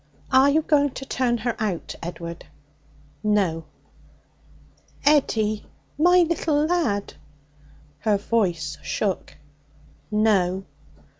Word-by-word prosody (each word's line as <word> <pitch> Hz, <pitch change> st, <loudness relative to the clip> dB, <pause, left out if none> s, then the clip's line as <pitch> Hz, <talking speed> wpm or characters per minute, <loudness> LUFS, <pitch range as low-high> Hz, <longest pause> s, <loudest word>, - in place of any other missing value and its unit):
'Are 265 Hz, +1 st, +6 dB
you 310 Hz, +2 st, +2 dB
going 290 Hz, -2 st, +3 dB
to 270 Hz, -, -6 dB
turn 245 Hz, -2 st, 0 dB
her 235 Hz, +1 st, -2 dB
out, 205 Hz, -6 st, -2 dB
Edward?' 170 Hz, 0 st, -7 dB, 0.8 s
'No.' 190 Hz, -7 st, +1 dB, 1.4 s
'Eddie! 220 Hz, -8 st, +2 dB, 0.3 s
my 355 Hz, +4 st, +5 dB
little 310 Hz, -3 st, +1 dB
lad!' 310 Hz, -, 0 dB, 0.9 s
Her 210 Hz, +4 st, +2 dB
voice 175 Hz, -8 st, -1 dB
shook. 195 Hz, -4 st, -3 dB, 0.7 s
'No.' 195 Hz, -4 st, +2 dB
215 Hz, 90 wpm, -24 LUFS, 190-285 Hz, 1.4 s, Are